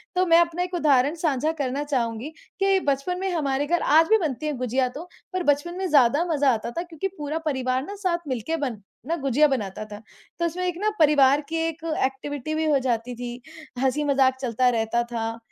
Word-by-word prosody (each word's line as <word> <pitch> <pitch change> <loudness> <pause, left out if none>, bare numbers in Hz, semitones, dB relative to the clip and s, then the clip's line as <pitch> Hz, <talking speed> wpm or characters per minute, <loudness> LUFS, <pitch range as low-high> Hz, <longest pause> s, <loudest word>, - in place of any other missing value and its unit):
तो 365 - +3
मैं 335 -1 +6
अपना 340 +1 +1
एक 360 0 -6
उदाहरण 290 -2 +3
साझा 310 -2 0
करना 275 +2 -1
चाहूँगी 245 -2 -2 0.3
कि 390 0 +3
बचपन 280 +7 -1
में 385 0 -1
हमारे 285 -3 0
घर 345 +1 +1
आज 320 +2 +5
भी 440 - +6
बनती 305 - -3
हैं 295 -4 -2
गुजिया 255 +1 0
तो, 315 +7 -9 0.3
पर 370 -1 -1
बचपन 290 +4 +1
में 380 -1 -1
ज़्यादा 285 +3 +4
मज़ा 285 -3 +3
आता 225 +2 -4
था - - +1
क्योंकि 350 +1 -4
पूरा 300 +2 -3
परिवार 260 -2 0
ना 405 - -7
साथ 345 -3 -1
मिलके 260 +5 -2
बन 250 -8 -3 0.3
ना 335 - 0
गुजिया 275 0 +3
बनाता 215 -8 -3
था। 210 0 -10 0.4
तो 340 - +1
उसमें 360 +2 -2
एक 350 -1 -2
ना 425 - +1
परिवार 290 -2 +5
की 330 - -3
एक 330 0 -6 0.2
एक्टिविटी 275 +2 -4
भी 315 0 0
हो 280 - +4
जाती 245 -1 -2
थी। 245 0 -6 0.4
हँसी-मज़ाक 270 -1 +2
चलता 250 0 +2
रहता 230 0 0
था 225 -1 -3
285 Hz, 205 wpm, -24 LUFS, 255-330 Hz, 0.4 s, मैं